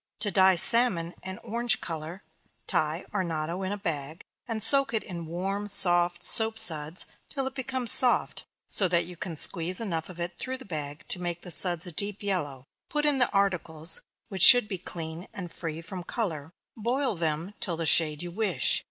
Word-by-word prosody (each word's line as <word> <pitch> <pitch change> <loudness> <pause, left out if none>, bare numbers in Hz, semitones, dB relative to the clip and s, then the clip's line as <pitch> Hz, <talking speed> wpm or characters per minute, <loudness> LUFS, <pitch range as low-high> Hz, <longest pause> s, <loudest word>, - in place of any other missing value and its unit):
To 210 -2 +2
dye 190 0 +4
salmon 180 -5 +2
and 190 +3 -8
orange 235 +1 +1
color, 165 +2 -7 0.4
tie 155 +3 -2
arnotto 170 -2 -3
in 190 0 -4
a 205 - -4
bag, 160 -4 -5 0.2
and 225 -3 -3
soak 275 -4 +5
it 220 - -1
in 170 -4 -8
warm 195 +5 -4
soft 175 -3 +4
soap 220 0 +6
suds, 160 -5 0 0.2
till 270 -2 -4
it 265 - -5
becomes 260 -2 0
soft, 250 -2 +4 0.2
so 195 - +1
that 170 -1 0
you 180 - -11
can 170 0 -7
squeeze 170 +3 -3
enough 170 -8 -4
of 175 -1 -12
it 175 0 -6
through 260 0 -5
the 260 - -14
bag 150 -4 -7
to 180 - 0
make 175 -1 -5
the 175 - -8
suds 175 0 +3
a 175 - -6
deep 200 +5 -2
yellow 145 -10 -3 0.2
put 300 0 -2
in 290 -2 +2
the 245 - +2
articles, 170 -5 0 0.3
which 190 -3 -7
should 245 +1 +9
be 190 -4 -6
clean, 165 0 -7
and 180 -3 -8
free 165 -1 -6
from 180 +2 -8
color; 165 -9 -5 0.2
boil 245 +4 -2
them 165 +2 -3
till 175 - -3
of 165 - -7
the - - -2
shade 155 0 +4
you 175 - -7
wish. 190 - 0
180 Hz, 195 wpm, -26 LUFS, 165-210 Hz, 0.4 s, should